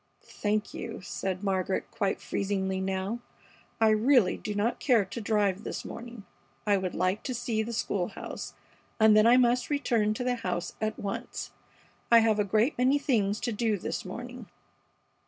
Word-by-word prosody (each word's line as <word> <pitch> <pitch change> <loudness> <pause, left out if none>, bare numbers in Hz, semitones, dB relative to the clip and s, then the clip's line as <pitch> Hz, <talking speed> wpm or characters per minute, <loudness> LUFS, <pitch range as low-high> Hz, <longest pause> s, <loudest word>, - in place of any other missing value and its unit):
"Thank 210 0 -2
you," 230 -3 -6
said 190 0 -4
Margaret, 190 -1 -1
quite 205 -4 -1
freezingly 190 -1 -1
now. 190 +4 -2 0.6
"I 225 -1 +5
really 215 -2 +4
do 210 - -5
not 215 +4 0
care 235 -7 +3
to 205 +5 -6
drive 205 -2 +1
this - - -5
morning. 235 -3 -8 0.4
I 205 -1 +4
would 185 -2 -2
like 185 +3 0
to 255 - -4
see 230 -2 -1
the 225 +2 -4
school 200 -5 -1
house, 205 - -7 0.4
and 220 -1 +6
then 215 +1 +6
I 245 +2 +7
must 245 0 +3
return 235 -7 +1
to 250 - -3
the 245 0 0
house 180 -5 -3
at 215 0 -1
once. 195 -1 -5 0.6
I 235 - +9
have 220 -2 +4
a - - +4
great 215 +7 +2
many 260 +3 +4
things 220 -8 +1
to 240 - -1
do 220 -1 0
this - - -4
morning." 240 +4 -8
215 Hz, 175 wpm, -29 LUFS, 195-235 Hz, 0.6 s, I